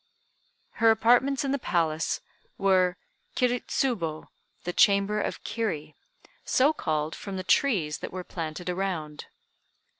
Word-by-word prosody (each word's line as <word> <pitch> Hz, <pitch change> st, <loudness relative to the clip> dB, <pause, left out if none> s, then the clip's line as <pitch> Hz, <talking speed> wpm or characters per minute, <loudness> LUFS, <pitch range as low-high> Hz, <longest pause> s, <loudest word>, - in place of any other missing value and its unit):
Her 225 Hz, -, +7 dB
apartments 245 Hz, +5 st, +3 dB
in 270 Hz, -, 0 dB
the 280 Hz, -, 0 dB
palace 165 Hz, -6 st, 0 dB, 0.4 s
were 185 Hz, -2 st, +3 dB, 0.4 s
Kiri 250 Hz, -1 st, +2 dB
Tsubo 170 Hz, -, -2 dB, 0.3 s
(the 175 Hz, -, -3 dB
chamber 200 Hz, +1 st, +4 dB
of -, -, -4 dB
Kiri); 195 Hz, -10 st, -3 dB, 0.5 s
so 280 Hz, +4 st, +3 dB
called 155 Hz, -, -2 dB
from 195 Hz, -2 st, -6 dB
the 185 Hz, -, -4 dB
trees 185 Hz, -, +2 dB
that -, -, -6 dB
were 185 Hz, 0 st, -5 dB
planted 165 Hz, 0 st, -6 dB
around. 175 Hz, -5 st, -3 dB
190 Hz, 125 wpm, -27 LUFS, 160-230 Hz, 0.5 s, Her